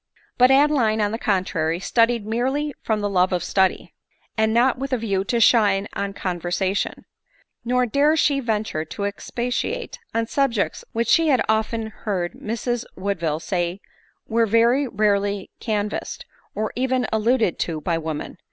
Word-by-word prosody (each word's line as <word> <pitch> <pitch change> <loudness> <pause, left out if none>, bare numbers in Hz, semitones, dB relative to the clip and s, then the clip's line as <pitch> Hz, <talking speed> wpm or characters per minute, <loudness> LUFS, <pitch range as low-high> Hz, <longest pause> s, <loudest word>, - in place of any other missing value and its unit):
But 250 +1 +7
Adeline, 270 -6 +3
on 205 -1 +1
the 225 - -3
contrary, 175 -6 0
studied 230 +2 +2
merely 265 +7 -1
from 215 -2 -1
the 205 - 0
love 185 -1 +2
of 180 -1 0
study, 190 -1 0 0.4
and 220 0 +2
not 245 +3 +3
with 275 0 -4
a - - +3
view 200 -4 -1
to 235 +3 0
shine 205 -4 +4
in 200 0 -3
conversa 180 +1 -2
tion; - - -3 0.6
nor 250 +1 +2
dared 285 +6 +2
she 285 -2 +3
venture 215 -9 -2
to 160 +5 -6
expatiate 245 - -3
on 230 0 0
subjects 240 -4 0
which 230 +1 -1
she 330 -1 +4
had 265 -5 +3
often 220 0 0
heard 185 -6 -3
Mrs 235 +2 -3
Woodville 170 -5 -2
say 175 +1 -2 0.5
were 230 0 +2
very 235 +6 +3
rarely 205 -2 0
canvassed, 210 -2 -3 0.3
or 215 0 -2
even 255 0 0
alluded 220 -3 +1
to 165 -2 -2
by 165 +1 -1
women. 160 -2 -5
220 Hz, 155 wpm, -22 LUFS, 195-245 Hz, 0.6 s, But